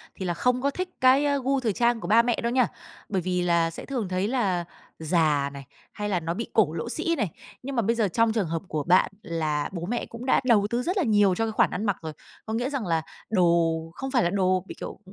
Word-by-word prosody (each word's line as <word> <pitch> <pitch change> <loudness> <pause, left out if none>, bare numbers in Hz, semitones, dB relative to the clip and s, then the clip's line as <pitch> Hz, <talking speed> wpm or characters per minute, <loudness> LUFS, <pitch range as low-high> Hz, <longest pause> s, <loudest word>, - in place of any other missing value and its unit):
thì 190 - -5
là 175 - 0
không 250 +7 +1
có 280 +1 +1
thích 365 +5 -4
cái 260 +3 +5 0.2
gu 275 +1 +1
thời 230 -5 0
trang 235 +2 +2
của 175 - -6
ba 220 +4 +6
mẹ 235 0 +1
đâu 235 - 0
nha. 250 -1 +3 0.4
Bởi 190 -3 0
vì 180 +1 -1
là 170 -1 +2
sẽ - - -9
thường 250 -7 -3
thấy 185 +2 0
là 200 -8 0 0.3
già 155 -3 +1
này, 140 0 -8 0.3
hay 210 0 -3
là 185 -3 +1
nó 165 0 -3
bị 230 +6 -4
cổ 195 -8 +3
lỗ 170 +8 -4
sĩ 335 +6 -1
này. 215 - -1 0.3
Nhưng 275 +1 -5
mà 235 - +2
bây 230 +2 +1
giờ 225 -3 +2
trong 230 +4 +2
trường 215 -6 0
hợp 165 0 -2
của 155 -3 -2
bạn 180 +3 +4
là 155 -4 -2
bố 170 -2 -4
mẹ 235 +5 -2
cũng 235 +2 -9
đã 260 - +3
đầu 215 -5 +4
tư 240 +2 -1
rất 365 +7 -1
là 375 - +2
nhiều 205 -6 +3
cho 225 - 0
cái 225 - -2
khoản 215 - +3
ăn 210 - -3
mặc 200 -3 0
rồi. 160 -1 -6 0.3
Có 220 - -4
nghĩa 245 +3 -1
rằng 275 -6 -3
là 165 -1 +1 0.3
đồ 170 -5 +3 0.2
không 270 +6 -5
phải 245 -3 +3
là 175 - +2
đồ 185 -1 +1
bị, - - -8
kiểu, - - -7
205 Hz, 265 wpm, -26 LUFS, 175-240 Hz, 0.4 s, ba